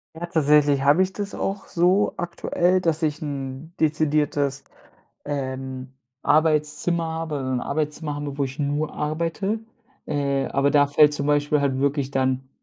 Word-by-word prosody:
Ja, 165 +2 -4
tatsächlich 150 -3 +3
habe 145 +6 +5
ich 190 0 -4
das 200 -1 -5
auch 195 0 -3
so 180 +4 +2
aktuell, 175 +1 0
dass 165 -2 0
ich 150 -1 -1
'n 140 +1 -6
dezidiertes, 150 -3 +1 0.6
ähm, 130 -2 -5 0.3
Arbeitszimmer 155 +2 +2
habe 160 -1 -3
‘n 130 -1 -1
Arbeitszimmer 150 0 -2
habe, 145 -1 -5
wo 140 - +1
ich 135 0 -5
nur 145 +1 -1
arbeite. 165 +8 -2 0.5
Äh, 140 -2 0
aber 140 +1 +1
da 145 0 +5
fällt 150 +1 +5
zum 145 -1 -2
Beispiel 145 0 +2
halt 135 -2 0
wirklich 140 0 0
dann 130 -1 0
150 Hz, 145 wpm, -23 LUFS, 140-160 Hz, 0.6 s, habe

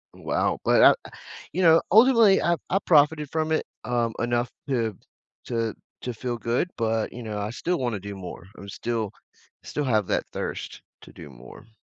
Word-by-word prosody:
wow, - - -1
but, - - +4
ah - - +5 0.4
you 185 - -2
know, 165 -1 +6
ultimately, 225 -2 +6
I 170 0 +3
I 195 - +2
profited 150 -1 +4
from 160 0 -1
it, 155 - +1 0.2
um, 120 -2 0
enough 120 +1 0 0.2
to 115 -6 0 0.5
to 115 -2 -2 0.3
to 125 - -4
feel 120 +1 -4
good, 120 - -1
but, 115 -1 0
you 120 0 -8
know, 105 -2 -4
I 105 +1 -3
still 170 +8 -2
wanna 120 -5 -2
do 100 +1 -7
more. 90 -2 -8
I'm 100 +1 -10
still 115 -3 -3 0.5
still 150 - -3
have 110 -6 +1
that - - 0
thirst - - -5 0.2
to - - -14
do 75 - -11
more. 65 - -14
120 Hz, 180 wpm, -25 LUFS, 110-155 Hz, 0.5 s, know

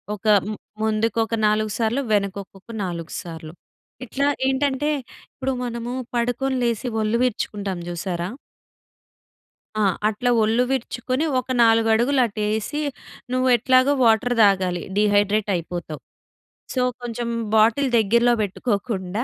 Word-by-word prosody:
ఒక 215 +2 -7 0.2
మ్ - - -4 0.3
ముందుకు 220 +1 0
ఒక 225 +1 -2
4 215 0 +1
సార్లు 230 +4 +1
వెనకకొక 200 0 -3
4 170 -3 -5
సార్లు. 160 -2 -9 0.5
ఇట్లా 280 +4 -1 0.2
ఏంటంటే 270 +2 0 0.4
ఇప్పుడు 265 0 -3
మనము 235 0 -4 0.2
పడుకొని 245 +3 0
లేసి 235 +1 -1
ఒళ్ళు 215 +2 +1
విరుచుకుంటాంజూసారా? 185 -6 -3 1.5
ఆ! - - +2 0.3
అట్లా 220 +4 -1
ఒళ్ళు 225 +3 +2
విరుచుకుని 255 +2 -1
ఒక 255 - -8
4 225 0 +4
అడుగులు 255 +4 +3
అటేసి, 215 +6 -2 0.5
నువ్వు 255 0 +1
ఎట్లాగో 255 +3 +4
వాటర్ 230 +2 +3
దాగాలి. 185 -3 +1 0.2
డీహైడ్రేట్ 205 0 +2
అయిపోతావు. 170 -3 -5 0.7
సో, 255 - 0 0.2
కొంచెం 240 0 -4 0.3
బాటిల్ 230 +6 +4
దగ్గరలో 235 +3 +3
పెట్టుకోకుండా, 205 0 -2
220 Hz, 110 wpm, -22 LUFS, 200-245 Hz, 1.5 s, 4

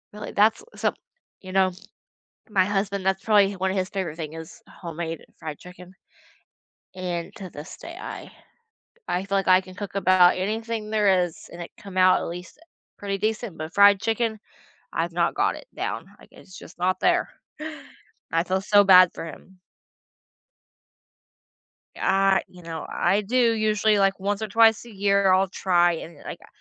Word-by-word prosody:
Really? 210 0 -7
That's 220 - +3
so - - 0 0.5
you 185 - -9
know, 190 -1 +3 0.8
my 190 -3 +3
husband, 200 -1 -2
that's 190 0 0
probably 205 -3 +4
one 190 0 -1
of 195 - -2
his 185 0 -1
favorite 185 -6 -4
thing 155 -2 -6
is 160 0 -10
homemade 165 -2 -6
fried 155 -2 -7
chicken. 180 0 -13 1.0
And 175 -2 -4
to 190 -2 -8
this 150 -1 -10
day, 335 0 -10
I - - -8 0.8
I 180 +2 -1
feel 200 0 -1
like 195 - -2
I 185 0 +7
can 185 -1 -13
cook 200 0 -7
about 185 -2 +5
anything 215 +3 -3
there 200 -4 +3
is 170 -2 -10
and 175 - -9
it 170 - -9
come 195 -2 -11
out 185 0 +5
at - - -4
least 175 - -9 0.4
pretty 200 -1 -3
decent. 215 -2 -3
But 155 +2 -6
fried 200 -1 +6
chicken, 225 0 -1 0.5
I've - - -1
not - - +1
got - - +1
it - - -11
down, - - -4
like, - - -18
it's 185 - -14
just - - -13
not 185 +1 0
there. - - +2 1.0
I 165 0 +2
feel 190 +1 -1
so 205 +1 +5
bad 185 -2 +7
for - - -7
him. 185 +4 -12 2.4
I 195 0 +2
you 180 - -16
know, 165 -1 -6
I 195 +4 +1
do 220 +5 -2 0.2
usually, 215 -1 +2
like 195 0 +2
once 200 +2 -2
or 220 - -2
twice 225 +2 +4
a 235 - -12
year, 200 -1 +3
I'll 190 +1 +3
try 175 -2 +2
and 165 -1 -8
like, - - -7
uh, - - -17
190 Hz, 175 wpm, -24 LUFS, 180-205 Hz, 2.4 s, I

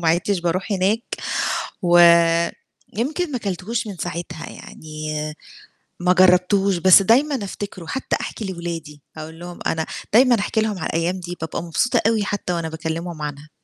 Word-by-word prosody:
وما 165 - +1
عدتش 180 +4 +1
باروح 180 +4 -1
هناك، 200 +4 +1 0.8
و 175 -1 +5 1.0
يمكن 300 +8 -1
ما 255 - -1
كلتهوش 215 +4 -3
من 200 -3 -6
ساعتها، 170 -2 -5
يعني 155 0 -8 0.9
ما 180 +1 +3
جرّبتهوش 185 +1 +4
بس 185 +2 +7
دايمًا 265 +9 +3
أفتكره، 195 -2 -7
حتّى 265 +11 -2
أحكي 220 - -5
لأولادي 170 -5 -6 0.2
أقول 160 +1 -8
لهم 175 0 -9
أنا 160 0 -1 0.3
دايمًا 240 0 +6
أحكي 220 +2 0
لهم 215 -2 -1
على - - -2
الأيام 170 +3 -1
دي 175 0 -6
بابقى 160 - -4
مبسوطة 175 +9 +1
أوي 225 -2 +2
حتّى 205 -3 -2
وأنا 165 -2 -2
باكلّمهم 160 +1 -5
عنها. 150 0 -6
180 Hz, 155 wpm, -21 LUFS, 165-205 Hz, 1.0 s, بس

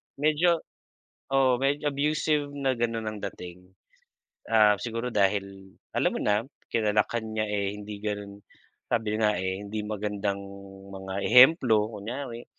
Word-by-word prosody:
medyo 155 +3 +2 0.7
oo 130 -2 +4
medyo 140 +3 0
abusive 145 0 0
na 135 -2 -1
gano'n 115 -2 -2
ang 110 -1 -4
dating. 90 +1 -12 0.8
Ah, 105 -2 +5
siguro 115 +1 -3
dahil, 100 -2 -1 0.2
alam - - +2
mo - - -3
na, 105 +1 +2 0.3
kinalakhan 110 +1 +1
niya 110 0 0
eh 100 -1 -1
hindi 105 0 -8
ganun 100 -1 -4 0.5
sabi 110 -2 0
nga 105 -1 +3
eh, 95 +2 -3
hindi 105 +1 -4
magandang 105 -1 -2 0.6
mga 95 0 -5
ehemplo 125 -4 +6
kunyari, 120 +3 -6
110 Hz, 130 wpm, -27 LUFS, 100-130 Hz, 0.8 s, ehemplo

